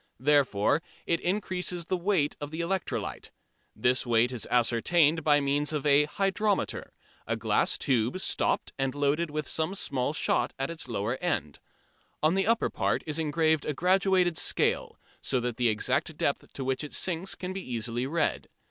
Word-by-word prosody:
Therefore 140 -1 +3 0.2
it 170 - +1
increases 180 -2 -1
the 185 - -1
weight 175 -5 +1
of 145 - -4
the 160 +2 -6
electrolyte. 185 +2 -3 0.5
This 125 +1 +2
weight 120 0 +2
is 125 -3 -3
ascertained 145 +7 +3
by 145 -1 +4
means 145 +1 0
of 150 -2 -2
a 145 0 +5
"hydrometer," 195 +4 -1 0.4
a - - 0
glass - - +1
tube, 125 +5 0
stopped, - - -1
and 135 0 -1
loaded 145 +3 +1
with 150 0 -3
some 160 +5 -1
small 135 -7 -1
shot - - 0
at 135 +3 -2
its 165 -4 -7
lower 115 +1 -2
end. 145 - -2 0.6
On 155 +2 +4
the 195 +1 +1
upper 230 0 +2
part - - 0
is 155 0 -2
engraved 160 0 +2
a 150 - -1
graduated 185 0 +2
scale, - - 0 0.2
so 130 - 0
that 120 -1 -3
the 120 -1 +2
exact 105 -1 0
depth - - -1
to 135 - -5
which 130 +2 -1
it 150 - -7
sinks 180 +1 -1
can 185 0 -5
be 195 - -4
easily 120 -2 -3
read. 160 +2 -1
150 Hz, 170 wpm, -28 LUFS, 130-175 Hz, 0.6 s, a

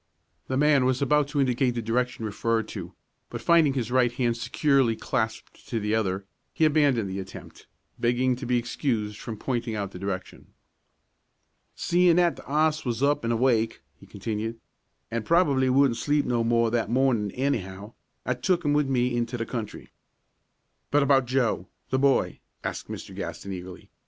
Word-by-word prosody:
The 130 - -1
man 145 -2 +4
was 130 0 +1
about 150 +1 +2
to 145 0 -2
indicate 125 -2 +1
the - - -1
direction 120 0 -1
referred 110 +2 -1
to; 95 -3 -7 0.4
but - - -5
finding 165 -5 +4
his 125 -3 -2
right 125 -2 +3
hand 120 -1 0
securely 135 -1 +2
clasped 110 0 -3
to 115 - -1
the 105 0 -1
other, 100 -3 0 0.3
he 160 - +3
abandoned 145 -8 +3
the 95 +1 -4
attempt, 95 0 -10 0.3
begging 125 +2 +2
to - - -6
be 125 0 +2
excused 115 -3 -2
from 110 -2 -6
pointing 120 -2 -2
out 100 -2 -3
the 90 - -9
direction. 95 -1 -5 1.3
"Seein' 175 -1 +3
that 175 -1 +3
the - - -12
'oss 155 +1 +2
was 120 0 -2
up 145 -2 +2
an' 115 - 0
awake," 115 -1 +1 0.2
he - - -16
continued, 110 +2 -4 0.5
"an' 115 0 -1
probably 140 -2 +3
wouldn't 130 -2 +3
sleep 145 0 +1
no 120 -2 +1
more 115 0 +2
that 115 -3 0
mornin' 120 -4 +2
anyhow, 105 -6 -3 0.3
I 125 - +1
took 170 +8 0
'im 145 - +3
with 145 -2 +2
me 125 -1 +1
into 120 +1 -1
the 115 - -2
country." 115 -3 -6 1.0
"But 145 0 +3
about 135 -2 +4
Joe, 120 -8 0 0.2
the 130 - +2
boy?" 140 0 +2 0.2
asked - - -4
Mr. - - -7
Gaston, 100 -1 -5
eagerly. 90 0 -9
120 Hz, 170 wpm, -26 LUFS, 110-140 Hz, 1.3 s, man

